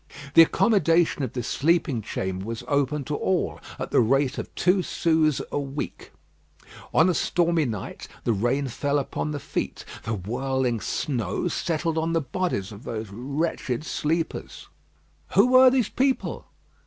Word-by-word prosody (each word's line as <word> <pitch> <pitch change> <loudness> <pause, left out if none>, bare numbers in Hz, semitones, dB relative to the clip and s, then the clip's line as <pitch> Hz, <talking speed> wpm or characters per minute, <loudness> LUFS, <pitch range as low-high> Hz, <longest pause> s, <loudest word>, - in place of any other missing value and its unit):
The - - +9
accommodation 170 -4 +3
of 130 -4 -3
this 125 -3 -3
sleeping 155 -5 +1
chamber 95 -2 -3
was 115 0 -5
open 145 0 +1
to 150 - -3
all, 185 +3 0 0.2
at - - -5
the - - +4
rate 135 +4 +2
of - - -5
two 185 +2 +3
sous 160 -4 +1
a - - 0
week. 140 +1 -5 0.8
On 160 - +5
a 180 - +3
stormy 170 -2 +1
night 110 -6 -5 0.2
the 115 - +2
rain 120 +7 0
fell 140 +4 -1
upon 145 +2 -2
the 145 -1 -3
feet, 140 - -4 0.2
the 115 - -2
whirling 125 +4 -1
snow 120 - -2
settled 165 -1 -1
on 165 +1 -1
the 165 - +3
bodies 135 - -2
of 105 +3 -11
those 110 -3 -5
wretched 135 +2 -2
sleepers. 160 +1 -3 0.7
Who 250 - +6
were 255 0 +8
these 250 -4 +1
people? 265 0 -1
145 Hz, 155 wpm, -25 LUFS, 120-165 Hz, 0.8 s, The